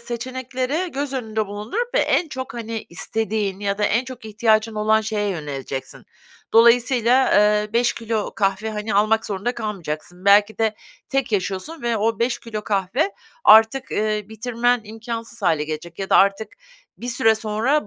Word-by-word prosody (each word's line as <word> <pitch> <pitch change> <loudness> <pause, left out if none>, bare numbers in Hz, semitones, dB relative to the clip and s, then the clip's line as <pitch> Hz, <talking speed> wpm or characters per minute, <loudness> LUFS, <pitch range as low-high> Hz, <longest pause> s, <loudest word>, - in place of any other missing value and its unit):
seçenekleri 260 +7 -3
göz 275 0 -3
önünde 220 -4 -2
bulundurup 215 - -4
ve - - +4
en 345 - +1
çok, 260 -2 -6
hani, 230 -1 -5
istediğin 210 +1 -2
ya 200 0 -1
da 210 - +1
en 230 +5 +1
çok 255 -3 -10
ihtiyacın 220 0 +1
olan 215 +1 +3
şeye 215 -1 -2
yöneleceksin. 140 -5 -6 0.5
Dolayısıyla, 240 +2 +5
ııı, 210 +1 +3
5 240 +1 +2
kilo 225 -2 -3
kahve, 195 +2 0
hani, 210 0 -3
almak 215 +2 +2
zorunda 210 +5 -2
kalmayacaksın. 180 -4 -5
Belki 205 +2 +5
de 220 -1 +1 0.3
tek 270 -4 -1
yaşıyorsun 200 - -2
ve 235 -1 0
o 220 +1 0
5 235 +1 0
kilo 215 -2 -6
kahve 210 - 0 0.3
artık, 225 +4 +6
ııı, 210 -1 -1
bitirmen 240 +2 0
imkânsız 230 +1 -7
hâle 160 -4 +2
gelecek 160 +3 -7
ya 195 - -4
da - - +6
artık 200 +2 +3 0.5
bir 245 - -6
süre 225 -2 +3
sonra 220 +5 0
220 Hz, 160 wpm, -22 LUFS, 205-240 Hz, 0.5 s, artık